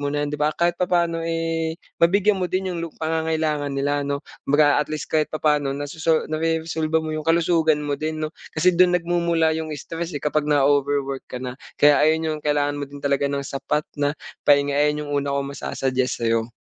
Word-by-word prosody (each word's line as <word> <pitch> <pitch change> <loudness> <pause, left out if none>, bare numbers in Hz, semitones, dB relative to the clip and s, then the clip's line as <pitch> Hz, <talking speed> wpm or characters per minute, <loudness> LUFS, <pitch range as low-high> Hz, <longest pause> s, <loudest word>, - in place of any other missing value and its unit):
mo 145 - -1
na 145 +1 -1
'yan, 145 - -5
'di 150 - -3
ba? 150 - +3
Kahit 175 +1 0
papaano, 170 -2 +1
eh, 165 -1 -1 0.2
mabigyan 195 +3 +3
mo 180 - 0
din 185 0 -1
'yong 170 - -4
lu 170 - -3
pangangailangan 160 -2 -1
nila 145 +1 0
'no? 140 0 -3 0.2
Kumbaga 145 0 +4
at 150 - -3
least 155 0 -5
kahit 155 -1 +2
papa'no 150 -3 0
nasoso 155 +3 0
nareresolba 160 0 0
mo 155 - -3
'yong 155 0 -4
kalusugan 165 -2 +2
mo 145 -1 -2
din, 155 0 -2
'no? 155 - -5 0.2
Kasi 180 +4 +4
do'n 180 0 +4
nagmumula 170 -2 +1
'yong 160 0 -3
stress 165 +3 -5
eh, 145 - -6
kapag 150 0 0
na-o-overwork 140 -1 +1
ka - - -6
na. 125 -1 -4 0.2
Kaya 145 0 +5
ayon 155 +1 +5
'yong 155 -1 -2
kailangan 145 -1 +1
mo 145 - -2
din 145 0 -10
talaga 140 0 +1
ng 140 0 -2
sapat 140 +3 -1 0.2
na 145 0 +1 0.3
pahinga, 145 0 +4
ayon 150 +1 +1
'yong - - -7
una 140 0 -2
kong 140 0 -2
masu - - -5
suggest 130 -1 0
sa'yo. 115 0 +1
150 Hz, 205 wpm, -23 LUFS, 145-165 Hz, 0.3 s, Kaya